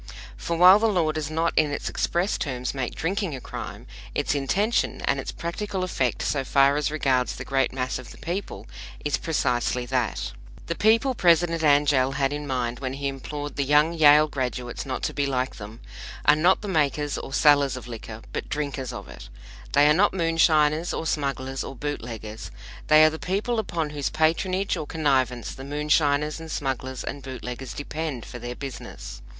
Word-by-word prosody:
For 170 Hz, -, -3 dB
while 185 Hz, +4 st, +8 dB
the 225 Hz, -, +3 dB
law 175 Hz, -7 st, +2 dB
does 155 Hz, -1 st, -3 dB
not 165 Hz, +2 st, 0 dB
in 155 Hz, -1 st, +3 dB
its 145 Hz, -, -4 dB
express 175 Hz, +4 st, 0 dB
terms 125 Hz, -6 st, -3 dB
make 130 Hz, -3 st, -3 dB
drinking 185 Hz, -1 st, -2 dB
a -, -, -6 dB
crime, -, -, -7 dB, 0.3 s
its -, -, +1 dB
intention 195 Hz, -, 0 dB
and -, -, 0 dB
its -, -, -4 dB
practical 190 Hz, +3 st, -4 dB
effect 130 Hz, -9 st, -1 dB
so 140 Hz, -2 st, 0 dB
far 140 Hz, +1 st, +4 dB
as 150 Hz, 0 st, 0 dB
regards 135 Hz, -5 st, +1 dB
the -, -, -7 dB
great 135 Hz, -1 st, +1 dB
mass 130 Hz, -1 st, -2 dB
of 125 Hz, -, -10 dB
the -, -, -12 dB
people 170 Hz, -, -5 dB, 0.4 s
is 145 Hz, -, +1 dB
precisely 125 Hz, -5 st, 0 dB
that. 125 Hz, -2 st, -1 dB, 0.3 s
The -, -, -2 dB
people 225 Hz, +8 st, +3 dB
President 170 Hz, -4 st, +3 dB
Angell 145 Hz, -3 st, +3 dB
had 135 Hz, +1 st, 0 dB
in 145 Hz, 0 st, -5 dB
mind 120 Hz, -2 st, -2 dB
when 130 Hz, -1 st, -3 dB
he 140 Hz, +1 st, -3 dB
implored 145 Hz, +1 st, -5 dB
the 140 Hz, -, +2 dB
young 150 Hz, +4 st, +4 dB
Yale 150 Hz, -1 st, +6 dB
graduates 125 Hz, -2 st, -4 dB
not 130 Hz, -, -4 dB
to -, -, -1 dB
be 145 Hz, -1 st, 0 dB
like 130 Hz, -1 st, -2 dB
them, 110 Hz, +2 st, -9 dB, 0.5 s
are 145 Hz, -, +7 dB
not 175 Hz, +7 st, +3 dB
makers 150 Hz, -6 st, 0 dB
or -, -, -8 dB
sellers 140 Hz, -2 st, +4 dB
of 120 Hz, -2 st, -9 dB
liquor, 115 Hz, -1 st, -8 dB
but -, -, -4 dB
drinkers 140 Hz, -3 st, -3 dB
of 100 Hz, -5 st, -8 dB
it. -, -, -11 dB, 0.4 s
They 145 Hz, +1 st, +6 dB
are 150 Hz, -, +6 dB
not 195 Hz, +5 st, +3 dB
moonshiners 165 Hz, -2 st, +3 dB
or -, -, -3 dB
smugglers 135 Hz, -3 st, -2 dB
or 135 Hz, -, -7 dB
bootleggers; 115 Hz, -6 st, -6 dB, 0.4 s
they 155 Hz, 0 st, +7 dB
are 155 Hz, -, +4 dB
the 160 Hz, -, -6 dB
people 210 Hz, +5 st, -1 dB
upon 165 Hz, -7 st, -2 dB
whose 145 Hz, -3 st, -2 dB
patronage 185 Hz, +5 st, +1 dB
or 155 Hz, -4 st, -5 dB
connivance 130 Hz, -6 st, 0 dB
the 135 Hz, -, -9 dB
moonshiners 150 Hz, +1 st, +1 dB
and 165 Hz, 0 st, -9 dB
smugglers 130 Hz, -3 st, -3 dB
and 140 Hz, -, -5 dB
bootleggers 130 Hz, -1 st, -7 dB
depend 145 Hz, -4 st, -4 dB
for 120 Hz, -, -8 dB
their 120 Hz, +1 st, -6 dB
business. 135 Hz, -, -8 dB
145 Hz, 185 wpm, -25 LUFS, 130-160 Hz, 0.5 s, while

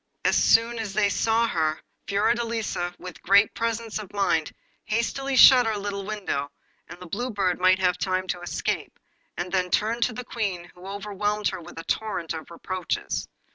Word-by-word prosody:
As -, -, +4 dB
soon 230 Hz, +1 st, +4 dB
as 215 Hz, -3 st, -4 dB
she 210 Hz, -1 st, +3 dB
saw 230 Hz, +1 st, +2 dB
her, 155 Hz, -5 st, 0 dB, 0.3 s
Fiordelisa, 220 Hz, -4 st, 0 dB
with 180 Hz, -1 st, -10 dB
great 200 Hz, +2 st, +5 dB
presence 230 Hz, -1 st, -2 dB
of 205 Hz, -2 st, -9 dB
mind, 165 Hz, -6 st, +1 dB, 0.3 s
hastily 265 Hz, +5 st, -1 dB
shut 255 Hz, -1 st, +8 dB
her 220 Hz, -1 st, 0 dB
little 200 Hz, -1 st, -4 dB
window, 190 Hz, -10 st, -3 dB, 0.4 s
that -, -, -11 dB
the 180 Hz, -, -9 dB
Blue 235 Hz, +9 st, -3 dB
Bird 195 Hz, -5 st, 0 dB
might 185 Hz, +1 st, +5 dB
have 180 Hz, -1 st, +1 dB
time 185 Hz, 0 st, 0 dB
to 175 Hz, -, -2 dB
escape, 175 Hz, -, -3 dB, 0.4 s
and 180 Hz, +1 st, -3 dB
then 185 Hz, -1 st, +1 dB
turned 225 Hz, +5 st, +1 dB
to 245 Hz, -, +2 dB
meet -, -, -11 dB
the 250 Hz, -, -5 dB
Queen, 190 Hz, -8 st, -3 dB
who 180 Hz, +1 st, -12 dB
overwhelmed 205 Hz, +1 st, -1 dB
her -, -, -6 dB
with 165 Hz, -, -12 dB
a 165 Hz, -, -6 dB
torrent 210 Hz, -7 st, -2 dB
of 160 Hz, -1 st, -7 dB
reproaches. 180 Hz, +1 st, -3 dB
200 Hz, 180 wpm, -25 LUFS, 180-225 Hz, 0.4 s, shut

